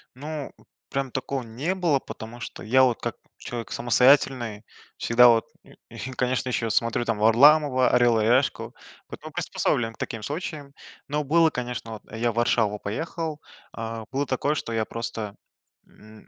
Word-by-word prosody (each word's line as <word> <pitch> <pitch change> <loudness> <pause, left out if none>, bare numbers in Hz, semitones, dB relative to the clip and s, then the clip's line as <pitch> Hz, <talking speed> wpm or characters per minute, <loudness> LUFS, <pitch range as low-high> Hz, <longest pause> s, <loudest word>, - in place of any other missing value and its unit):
Ну, 150 +2 -6 0.4
прям 135 -1 -2
такого 130 0 -3
не 130 +11 -3
было, 170 -7 +2
потому 115 0 -9
что 115 - -8
я, 130 +4 +4
вот, 125 -4 +2
как - - -3 0.2
человек 120 -2 -6
самостоятельный, 120 -3 +3 0.3
всегда, 125 +1 +5
вот, 115 -1 +3 0.2
и - - -18 0.2
и 130 - -7
конечно, 130 0 -1
еще, 115 -2 -1
смотрю 115 +2 +1
там 115 -2 -1
Варламова, 130 +4 +5
"Орел 120 -2 +4
и - - +1
решку", 125 +5 +1 0.3
потом - - -9
приспособлен 115 -2 -1
к - - -21
таким 115 -2 -5
случаям. 145 - -5 0.3
Но 150 +1 -1
было, 160 +3 +4
конечно, 125 -3 -5
вот, 110 - -9
я 115 +1 0
в - - -12
Варшаву 110 -3 +1
поехал, 155 - -4 0.4
э, 115 0 -5
было 140 +2 -1
такое, 140 +3 0
что 115 - -4
я 110 -1 +1
просто, 110 -3 -5 0.5
м, 110 0 -17
125 Hz, 160 wpm, -25 LUFS, 115-140 Hz, 0.5 s, всегда